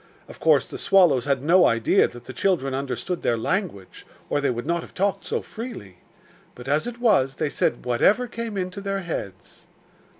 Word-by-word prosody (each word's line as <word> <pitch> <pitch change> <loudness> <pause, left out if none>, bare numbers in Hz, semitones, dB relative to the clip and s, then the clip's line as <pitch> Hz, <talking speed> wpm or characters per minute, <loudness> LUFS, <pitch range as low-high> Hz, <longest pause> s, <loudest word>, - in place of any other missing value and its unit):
Of - - -13
course - - +4
the - - -8
swallows 175 -11 +4
had 140 -2 0
no 180 +4 +5
idea 115 -1 +3
that 120 0 -12
the 130 - -8
children 135 -2 0
understood 140 +6 -3
their 120 - +1
language, 135 - -3 0.3
or 145 - +1
they 140 - +1
would 120 0 -3
not 170 +2 0
have - - -13
talked 195 +1 -1
so - - -2
freely; 210 - -8 0.6
but, 125 +1 -11
as 150 - +1
it 240 -1 -7
was, 135 - +3
they 155 -1 -1
said 120 - -1
whatever 195 - +3
came 230 -3 -5
into 185 +1 -4
their 195 0 -2
heads. 100 - -7
155 Hz, 190 wpm, -24 LUFS, 125-195 Hz, 0.6 s, no